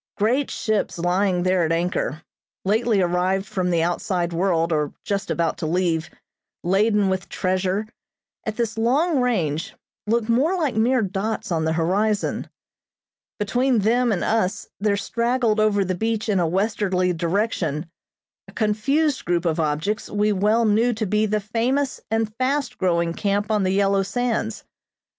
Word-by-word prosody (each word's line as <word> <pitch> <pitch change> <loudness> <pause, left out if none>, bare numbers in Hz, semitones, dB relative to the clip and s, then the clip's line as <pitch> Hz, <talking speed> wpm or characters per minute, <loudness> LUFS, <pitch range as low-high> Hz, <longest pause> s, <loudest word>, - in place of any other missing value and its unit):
Great 250 +7 +1
ships 215 -5 -1
lying 180 +1 +1
there 185 -1 +2
at 160 - 0
anchor, 165 -2 -1 0.4
lately 215 +1 +2
arrived 180 +2 +1
from 185 -2 -2
the 170 -2 +2
outside 175 0 -1
world 170 -2 +1
or 150 -1 0
just 200 -3 -2
about 165 0 0
to 160 - -2
leave, 165 -1 0 0.5
laden 205 +3 +2
with 190 -1 -2
treasure, 185 +3 -1 0.6
at 220 - -3
this 225 -1 -2
long 280 +7 +2
range 185 - -1 0.3
looked 230 0 +1
like 295 +5 +1
mere 235 +2 +2
dots 195 +2 -3
on 160 -2 0
the 160 - +1
horizon. 200 +6 0 0.9
Between 245 +5 +1
them 235 +3 +2
and 195 - 0
us 210 -2 0
there 200 0 +1
straggled 235 +2 0
over 205 -2 +2
the 185 - -1
beach 220 +4 -2
in 200 -3 +2
a 170 - +2
westerly 185 -1 0
direction, 170 -3 -1 0.6
a - - -14
confused 270 +7 +1
group 175 0 0
of 165 -1 0
objects 160 +7 -1
we 210 +1 +1
well 210 +4 +2
knew 225 +3 +3
to 220 0 -2
be 210 +2 +1
the 215 +1 0
famous 245 +6 -1
and 225 -1 0
fast 275 +2 -1
growing 170 -2 +1
camp 205 +3 -1
on 210 -1 +2
the 185 - +1
yellow 195 0 +2
sands. 230 - -2
200 Hz, 150 wpm, -23 LUFS, 180-225 Hz, 0.9 s, knew